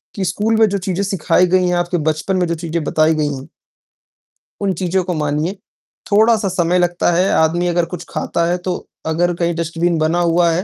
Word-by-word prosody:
कि 195 -2 -2
स्कूल 210 +5 0
में 220 - +6
जो 200 - -1
चीज़ें 190 +1 -2
सिखाई 185 -1 +2
गई 185 0 +2
हैं, 180 - +1
आपके 175 0 0
बचपन 155 +4 -1
में 180 - +1
जो 170 - -1
चीज़ें 165 -1 -3
बताई 155 +1 +2
गई 150 -2 -1
हैं 135 +4 -10 1.1
उन 195 -2 +1
चीज़ों 185 0 0
को 180 0 -3
मानिए, 150 +3 -1 0.6
थोड़ा-सा 215 0 +4
समय 180 0 +1
लगता 175 0 +1
है, 180 +3 +2
आदमी 170 +2 +2
अगर 175 -1 +1
कुछ 175 - -6
खाता 170 - -1
है 175 +1 0
तो 180 - +1 0.3
अगर 175 +2 +1
कहीं 170 0 0
डस्टबिन 170 +1 -1
बना 160 +2 +1
हुआ 170 0 +3
है, 175 +3 -1
175 Hz, 205 wpm, -18 LUFS, 165-185 Hz, 1.1 s, में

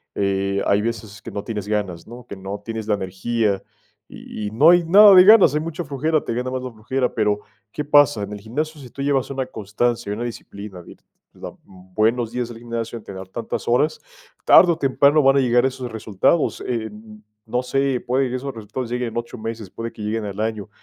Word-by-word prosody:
eh, 100 0 0
hay 100 +1 +2
veces 110 -2 -5
que - - -8
no 100 - -5
tienes 105 -4 -5
ganas, 100 -5 -3
¿no? 120 +1 -11
Que - - -8
no 95 +2 -6
tienes 115 -2 -5
la 105 - +2
energía 100 +2 -1 0.5
y 105 - -7
y - - -5
no 140 +9 +5
hay 175 -1 +5
nada 200 +4 +8
de 180 -1 +9
ganas, 200 -8 +7
hay 150 - +1
mucha 165 +2 -5
flojera, 150 +2 -1
te - - -3
gana 125 +2 -2
más 130 0 -3
la 130 - -5
flojera, 125 +4 -2
pero, 105 -2 0 0.3
¿qué 150 - -4
pasa? 145 -7 +4
En 100 - -6
el 105 - -6
gimnasio 150 +9 -4
si 130 -3 -11
tú 140 - -8
llevas 140 -2 0
una 135 -1 -3
constancia 115 0 -2
y 105 - -2
una 115 - -4
disciplina, 100 -5 -8
de - - -13 0.7
buenos 110 +6 -1
días 125 0 -2
del 115 -1 -10
gimnasio 115 0 -5
en 110 - -12
tener 95 -1 -9
tantas 115 +3 -5
horas, 125 +6 +1 0.5
tarde 180 - +7
o 165 - -1
temprano 140 +1 +3
van 135 0 +4
a - - +5
llegar 120 0 +3
esos 130 -2 -3
resultados, 110 - 0
e 115 -3 -2
e 110 - -7 0.5
no 125 +3 -2
sé, 135 0 0
puede 130 +2 +1
que 125 - -3
esos 135 +2 -4
resultados 115 +2 -6
lleguen 125 -1 -2
en 115 - -7
8 120 +1 -5
meses, 110 -2 -6
puede 115 +3 -6
que - - -12
lleguen 110 +1 -2
al 100 0 -6
año, 110 -2 -3
115 Hz, 220 wpm, -21 LUFS, 105-135 Hz, 0.7 s, de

